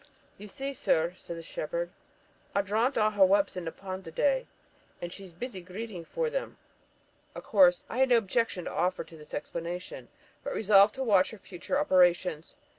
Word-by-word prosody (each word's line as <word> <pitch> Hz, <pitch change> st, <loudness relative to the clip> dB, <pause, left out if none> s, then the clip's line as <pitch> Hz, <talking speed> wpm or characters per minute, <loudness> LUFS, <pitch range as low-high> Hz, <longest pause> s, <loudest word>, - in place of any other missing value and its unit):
'Ye 210 Hz, -, -9 dB
see, 270 Hz, +7 st, -5 dB
sur,' 170 Hz, -8 st, +1 dB
said 170 Hz, -2 st, -8 dB
the 165 Hz, -, -8 dB
shepherd, -, -, -4 dB, 0.6 s
'au 200 Hz, -, +3 dB
drownt 225 Hz, +7 st, +1 dB
a' 215 Hz, -1 st, +3 dB
her 205 Hz, -2 st, +4 dB
whelps 200 Hz, +1 st, +3 dB
i' -, -, -2 dB
the 165 Hz, -1 st, -4 dB
pond 190 Hz, +1 st, -7 dB
the 165 Hz, -, -8 dB
day, 265 Hz, -, +1 dB, 0.5 s
and 175 Hz, 0 st, -6 dB
she's 195 Hz, -2 st, -10 dB
busy 190 Hz, +3 st, -6 dB
greeting 185 Hz, 0 st, -7 dB
for 485 Hz, -, -2 dB
them.' -, -, -4 dB, 0.8 s
Of -, -, -7 dB
course, 180 Hz, -4 st, +4 dB
I 240 Hz, -, -4 dB
had 265 Hz, 0 st, +4 dB
no 240 Hz, -, +6 dB
objection 225 Hz, -4 st, 0 dB
to -, -, -4 dB
offer 180 Hz, -, 0 dB
to 165 Hz, -, -15 dB
this 150 Hz, -1 st, -10 dB
explanation, 170 Hz, +4 st, -5 dB, 0.4 s
but -, -, -4 dB
resolved 205 Hz, -1 st, +5 dB
to 265 Hz, -, -2 dB
watch 200 Hz, -6 st, +4 dB
her 220 Hz, -, -10 dB
future 190 Hz, +7 st, -4 dB
operations. 180 Hz, -, +2 dB
195 Hz, 190 wpm, -29 LUFS, 175-230 Hz, 0.8 s, no